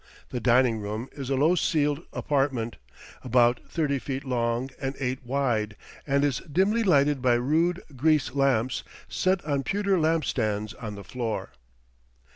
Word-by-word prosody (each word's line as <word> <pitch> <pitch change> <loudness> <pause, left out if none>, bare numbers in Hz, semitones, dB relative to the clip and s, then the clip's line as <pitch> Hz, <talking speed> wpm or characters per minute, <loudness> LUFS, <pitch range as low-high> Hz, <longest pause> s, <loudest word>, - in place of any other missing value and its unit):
The 125 - -3
dining 120 -1 +3
room 105 +4 -4
is 135 -3 -7
a 135 - +1
low 150 +6 +4
ceiled 150 -4 +1
apartment, 135 -5 -1 0.5
about 120 -1 +3
thirty 145 -5 0
feet 135 +2 -5
long 120 0 -1
and 135 0 -2
eight 130 -1 -2
wide, 120 -5 0 0.3
and 140 0 +2
is 140 -4 +1
dimly 195 +8 +2
lighted 145 - +3
by 125 -2 +4
rude 160 +9 +1
grease 150 0 +2
lamps, 130 -3 +1 0.2
set 185 -2 0
on 140 -3 0
pewter 195 +2 +1
lamp 160 -1 +2
stands 110 -3 -1
on 105 -5 -7
the 100 - -9
floor. 115 - -4
135 Hz, 150 wpm, -26 LUFS, 120-150 Hz, 0.5 s, low